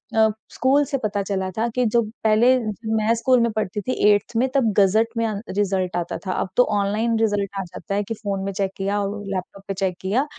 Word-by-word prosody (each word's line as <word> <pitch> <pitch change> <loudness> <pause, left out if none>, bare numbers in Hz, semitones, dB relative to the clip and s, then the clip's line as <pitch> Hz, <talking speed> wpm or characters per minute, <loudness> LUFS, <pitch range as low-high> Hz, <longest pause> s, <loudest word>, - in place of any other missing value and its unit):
अ, 220 0 +5 0.2
school 270 +4 +3
से 275 - -2
पता 205 -1 0
चला 190 -1 -2
था 225 +2 +1
कि 250 -1 +2
जब 225 -1 +1
पहले 225 +4 +5
जब 220 0 -4
मैं 215 +1 +2
स्कूल 255 +2 +3
में 235 0 +2
पढ़ती 210 -1 -2
थी 255 +5 -2 0.2
8th 205 +3 -2
में। 255 - +3
तब 235 -6 +3
गज़ट 210 +3 +4
में 230 - +1
अन 205 -2 -3 0.2
रिज़ल्ट 190 -3 0
आता 175 - -3
था। 185 - -1
अब - - -2
तो 250 - +7 0.2
ऑनलाइन 215 +3 0
रिज़ल्ट 205 -3 +1
आ - - -2
जाता 185 +3 -6
है, 205 - +1
कि 225 - -4
फ़ोन 205 -3 -3
में 195 - -2
चेक 195 -1 -1
किया 200 +1 -1
और 205 +1 -3
लैपटॉप 190 +1 -6
पे 195 - -2
चेक 190 -2 -2
किया, 215 +9 +1
210 Hz, 235 wpm, -22 LUFS, 195-230 Hz, 0.2 s, तो